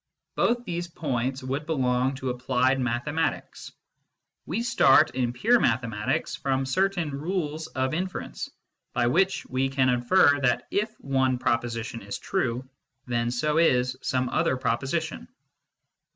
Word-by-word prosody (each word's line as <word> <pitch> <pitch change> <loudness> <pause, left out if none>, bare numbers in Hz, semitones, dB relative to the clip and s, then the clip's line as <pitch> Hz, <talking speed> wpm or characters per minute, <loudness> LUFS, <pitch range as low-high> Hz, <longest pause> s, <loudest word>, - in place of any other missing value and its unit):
Both 240 +1 +1
these 175 -1 -3
points 135 -5 -2
would 135 +3 -3
belong 130 -3 +1
to 130 -1 -3
applied 130 +1 +1
mathematics. 140 +6 -2 0.8
We 210 +9 -1
start, 240 - +5
in 125 -2 -1
pure 225 - +3
mathematics, 115 - 0
from 135 -1 -1
certain 175 +2 0
rules 155 +1 -3
of 130 -1 -2
infer 185 +3 -2
ence, - - -7 0.4
by 120 0 +1
which 185 +10 +2
we 130 +1 -1
can 135 -1 +2
infer 140 +4 +4
that 125 -3 +1
if 210 +2 0
one 130 -2 +1
proposition 115 -1 -2
is 100 +1 -5
true, 130 -9 -2 0.4
then 120 -1 0
so 150 +6 +1
is 125 -6 +3
some 130 -1 0
other 130 - +1
proposition. 135 +7 -2
130 Hz, 135 wpm, -26 LUFS, 125-160 Hz, 0.8 s, start